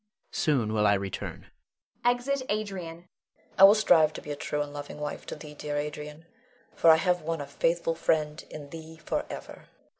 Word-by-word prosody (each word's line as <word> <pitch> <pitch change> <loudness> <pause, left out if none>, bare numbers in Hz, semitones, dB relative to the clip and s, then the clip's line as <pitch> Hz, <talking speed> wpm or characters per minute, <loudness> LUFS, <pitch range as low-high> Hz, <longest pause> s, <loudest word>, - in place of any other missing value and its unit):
Soon 125 -8 +1
will 105 -1 +3
I 100 - +5
return. 95 -1 -5 0.6
[Exit 245 +3 +1
Adrian. 205 -4 -2
Leonore. 170 +2 -11 0.5
I - - +8
will 200 +2 +8
strive 165 -8 +5
to - - -7
be 150 - -6
a - - -2
true 145 +1 -2
and 145 0 -9
loving 145 0 -7
wife 150 - -5
to - - -5
thee, 150 -1 -10
dear 150 0 -4
Adrian; 150 +1 -5 0.5
for 165 - +4
I 160 - +10
have 180 +2 +1
won 165 +1 -2
a 145 - -4
faithful 165 +4 0
friend 155 -1 0
in 145 -2 -9
thee 160 0 -9
forever. 155 - -5
155 Hz, 185 wpm, -28 LUFS, 145-170 Hz, 0.6 s, I